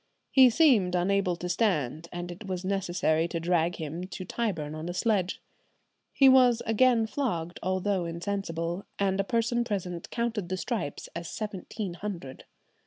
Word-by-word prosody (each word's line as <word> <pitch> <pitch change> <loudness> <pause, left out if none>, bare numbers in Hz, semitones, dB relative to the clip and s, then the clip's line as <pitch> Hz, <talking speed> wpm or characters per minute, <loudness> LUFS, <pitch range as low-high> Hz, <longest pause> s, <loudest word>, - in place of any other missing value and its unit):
He 260 -2 +8
seemed 230 - +4
unable 185 0 +1
to 175 +1 -5
stand, 170 - 0
and 175 0 -5
it 195 +4 -9
was 185 -1 -3
necessary 175 -4 +1
to 170 -1 -3
drag 170 0 +1
him 160 +2 -5
to 185 -1 -7
Tyburn 175 -9 -2
on 155 +2 -5
a 175 - -4
sledge." 195 -4 0 0.7
He 275 - +5
was 250 -3 +6
again 230 +1 +4
flogged, 175 - -3
although 185 0 0
insensible, 170 0 -3
and 195 -1 +1
a - - +3
person 235 +2 +1
present 180 -6 -4
counted 235 -6 -2
the 185 - -1
stripes 210 - -3
as 170 -2 -5
seventeen 205 -1 -5
hundred. 170 -8 -7
185 Hz, 155 wpm, -28 LUFS, 170-220 Hz, 0.7 s, He